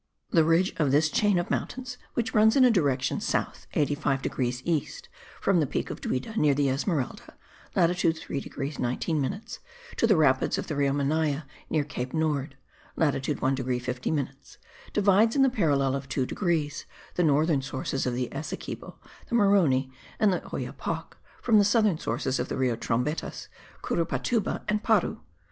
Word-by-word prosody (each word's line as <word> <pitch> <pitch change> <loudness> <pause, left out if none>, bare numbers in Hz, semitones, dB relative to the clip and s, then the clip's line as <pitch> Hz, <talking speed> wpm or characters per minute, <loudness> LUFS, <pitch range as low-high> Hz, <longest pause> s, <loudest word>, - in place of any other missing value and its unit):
The 165 - +5
ridge 165 +4 +3
of 150 -4 +2
this 150 +2 +3
chain 205 -3 +3
of 175 +3 -2
mountains, 250 0 -3 0.2
which 230 -2 -1
runs 220 0 +5
in 265 -2 +6
a 250 - +6
direction 140 - +1
south - - -2
85 145 -2 0
degrees 125 -1 -2
east 175 - -2 0.3
from 195 -3 +2
the 150 - +1
peak - - -3
of - - -7
Duida 130 - -3
near 145 -2 +4
the 140 -1 +2
Esmeralda 140 0 -2 0.4
(latitude 170 -1 +2
3 140 - -4
degrees 140 +1 -5
19 145 +6 -1
minutes), 195 +11 -4 0.4
to 230 - +3
the 210 -6 +4
rapids 130 -4 +3
of - - -3
the 155 - -4
Rio 140 -1 +2
Manaye 145 +1 0 0.3
near 155 -2 +1
Cape 130 -1 -5
Nord 150 -3 -1 0.4
(latitude 145 -2 0
1 130 - +3
degree 130 -1 -1
50 125 0 -3
minutes), 135 -3 -4 0.3
divides, 210 +2 +4
in 275 - +5
the 265 - +4
parallel 145 - +2
of 135 0 -5
2 130 - 0
degrees, 160 -3 -1 0.3
the 180 - +1
northern 150 -1 +3
sources 130 0 -3
of 125 - -1
the 125 0 -1
Essequibo, 155 +3 -6 0.3
the 235 - 0
Maroni 175 - +3 0.3
and 210 -3 +4
the - - -1
Oyapoc, - - -5 0.3
from 225 -3 +5
the - - +6
southern 205 -5 +3
sources 130 +2 -1
of - - -1
the - - -3
Rio 130 -3 +1
Trombetas, 125 +7 -2 0.3
Curupatuba 195 +6 -1
and 210 0 +1
Paru. 220 -5 +2
150 Hz, 170 wpm, -27 LUFS, 135-195 Hz, 0.4 s, in